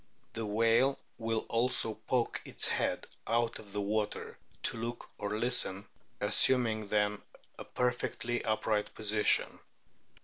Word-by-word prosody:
The 115 -1 -3
whale 115 +5 +3 0.2
will 115 -1 -1
also 115 -1 +2
poke 115 +3 -1
its - - +2
head - - -1 0.2
out 115 0 +1
of 100 - -13
the 105 +1 -2
water 105 +1 -2 0.3
to - - +1
look 115 +1 -5
or 105 +1 -2
listen, 110 -5 +3 0.3
assuming 115 -5 +2
then 105 0 +1 0.4
a - - -7
perfectly 120 -1 -1
upright 110 -1 0
position. 105 0 +2
110 Hz, 125 wpm, -32 LUFS, 105-120 Hz, 0.4 s, whale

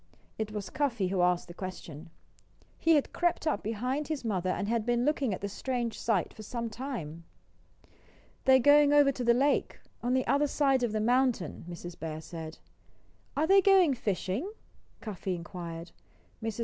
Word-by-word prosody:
It 215 -1 -2
was 205 -2 -5
Cuffy 240 -10 0
who 190 -1 0
asked 180 0 +2
the 175 - -9
question. 175 -3 -8 0.7
He 330 0 +4
had 290 - 0
crept 345 -1 0
up 310 - 0
behind 250 +7 -2
his 300 -6 -4
mother 185 -4 -1
and 200 +2 -1
had 230 0 0
been 240 +1 +1
looking 285 -5 +1
at 185 - -4
the 200 - -2
strange 240 +2 -3
sight 205 -7 0
for 220 - -11
some 230 +1 -4
time. 210 - -6 1.2
"They're 265 0 +7
going 290 +2 +6
over 290 -1 +6
to 255 - -5
the 235 0 +4
lake, 280 +3 +1 0.2
on 245 +1 +1
the 260 - +1
other 285 +1 +2
side 275 -2 +2
of 240 -3 0
the 215 - -1
mountain," 240 - +1
Mrs. 175 0 -8
Bear 155 -1 -5
said. 160 0 -8 0.8
"Are 305 - +3
they 390 +3 +6
going 375 -6 +5
fishing?" 225 - -2 0.5
Cuffy 195 -3 -4
inquired. 170 -1 -7 0.5
Mrs. 225 0 -4
230 Hz, 175 wpm, -30 LUFS, 185-275 Hz, 1.2 s, They're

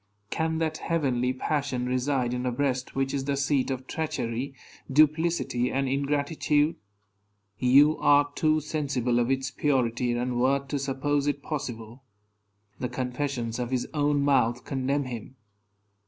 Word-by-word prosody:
Can 160 0 0
that 160 -1 -1
heavenly 130 -7 0
passion 130 -1 -1
reside 125 0 0
in 125 0 -2
a - - +1
breast 130 0 -1
which 135 0 0
is 135 -1 -2
the 140 0 0
seat 140 -1 +1
of 130 -1 -3
treachery, 135 -4 -3 0.4
duplicity, 155 -4 +2
and 135 0 0
ingratitude? 145 +2 +1 0.8
You 140 +5 +5
are 145 0 +4
too 155 0 +2
sensible 135 -6 0
of 120 +1 +1
its 135 0 0
purity 125 -4 +1
and 120 0 -1
worth 135 +2 +1
to 145 - -1
suppose 140 +1 0
it 145 -1 -1
possible. 120 -4 -5 0.8
The 125 - -2
confessions 125 -2 -3
of 120 -1 -2
his 130 -1 -1
own 145 -1 +2
mouth 125 -4 +2
condemn 135 +1 -1
him. 125 0 -7
135 Hz, 140 wpm, -27 LUFS, 125-145 Hz, 0.8 s, You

